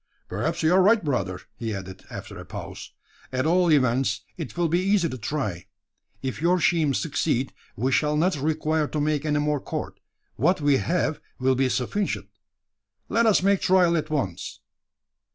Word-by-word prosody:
"Perhaps - - -2
you 160 +2 +4
are 190 - +6
right, 210 +2 +4
brother," 100 -10 -1 0.2
he 110 -2 -3
added, 95 0 -8
after - - -8
a - - -7
pause. - - -8 0.4
"At 130 +1 0
all 175 +1 +3
events, 125 -5 +2
it 165 0 -7
will 175 -1 +2
be 170 +2 +2
easy 190 -2 +2
to 130 - -5
try. 105 - -3 0.6
If 130 +2 -3
your 180 +2 +3
scheme 155 -3 +2
succeed, 140 -4 0 0.2
we 130 +5 0
shall 150 +2 +2
not 180 +3 +2
require 155 +1 0
to 150 - -3
make 150 0 0
any 150 -1 +1
more 150 0 +1
cord. - - -5 0.4
What 170 +10 +2
we 145 -2 +3
have 170 0 0 0.2
will 130 +1 +2
be 130 0 +1
sufficient. 165 +12 -1 0.8
Let 230 0 +3
us 205 -4 +4
make 200 0 +3
trial 180 -2 +4
at 155 -1 -1
once!" 130 - -3
150 Hz, 170 wpm, -25 LUFS, 130-175 Hz, 0.8 s, are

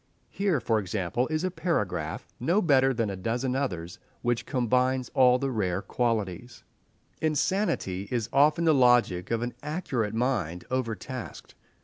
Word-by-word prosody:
Here, 195 -7 +1
for 115 -1 +1
example, 95 +4 -1
is 155 +1 -1
a 185 - 0
paragraph—no 165 - -1
better 135 -5 +4
than 115 -5 -1
a - - -4
dozen 120 +7 -2
others—which 115 +1 -3
combines 125 0 +1
all 125 -1 +5
the 135 +1 -2
rare 95 -5 -1
qualities:— 115 0 -2 0.6
"Insanity 155 - 0
is 120 -4 -1
often 150 +4 +4
the 160 - +5
logic 120 -9 +3
of 115 0 0
an 120 0 -3
accurate 135 - -2
mind 110 -9 -1
overtasked. 130 0 -4
125 Hz, 130 wpm, -27 LUFS, 110-140 Hz, 0.6 s, all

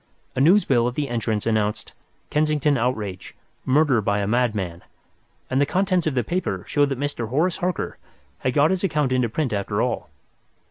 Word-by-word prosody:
A 130 - +1
news 185 +8 +5
bill 120 -3 +3
at 125 - -3
the 145 -2 -2
entrance 110 -3 -1
announced 110 -2 -1 0.4
"Kensington 150 -1 +2
Outrage. 110 -7 -3 0.3
Murder 135 -3 +3
by 100 0 0
a 100 - 0
Madman," 105 -7 0 0.7
and 130 +2 +1
the - - +4
contents 185 -1 +1
of 145 - -1
the 125 - +1
paper 180 - -2
showed 145 -1 +2
that 135 -2 -3
Mr. 140 -6 -3
Horace 165 +8 +1
Harker 180 -1 -3 0.4
had 130 - -1
got 150 +4 +4
his 190 0 -1
account 150 -7 +1
into 125 -2 +1
print 130 0 -1
after 100 +1 -2
all. 125 0 -1
130 Hz, 180 wpm, -23 LUFS, 110-150 Hz, 0.7 s, news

